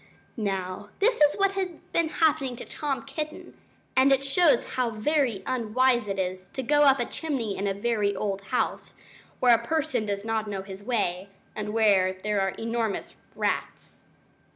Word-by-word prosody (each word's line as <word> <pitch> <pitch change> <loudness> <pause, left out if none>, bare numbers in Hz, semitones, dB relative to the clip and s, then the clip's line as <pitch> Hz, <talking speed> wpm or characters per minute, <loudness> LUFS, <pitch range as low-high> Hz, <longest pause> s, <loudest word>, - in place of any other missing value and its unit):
Now, 195 -2 -3
this 450 -2 +2
is 295 0 +5
what 395 -1 +2
had 375 -4 -3
been 335 -1 +1
happening 280 -6 +1
to 240 - -8
Tom 285 -3 -3
Kitten, 300 +3 -6 0.4
and 265 +1 +5
it 270 0 +3
shows 280 -2 +4
how 250 -2 +1
very 230 -2 0
unwise 245 0 +1
it 195 -1 -3
is 185 0 -3
to 265 - -3
go 295 +3 +4
up 275 -1 +5
a 240 - +1
chimney 250 -9 -3
in 200 - -2
a 195 - +1
very 205 -1 0
old 195 -2 -2
house, 250 - -2 0.4
where 245 -1 +6
a 235 0 +2
person 315 -6 -1
does 200 0 -3
not 220 -1 -1
know 195 -2 -4
his 195 0 -9
way, 200 -5 -1 0.3
and 210 0 -4
where 200 -4 +3
there 210 -1 +1
are 195 - +1
enormous 230 -2 -2 0.2
rats. - - -3
230 Hz, 175 wpm, -27 LUFS, 200-275 Hz, 0.4 s, where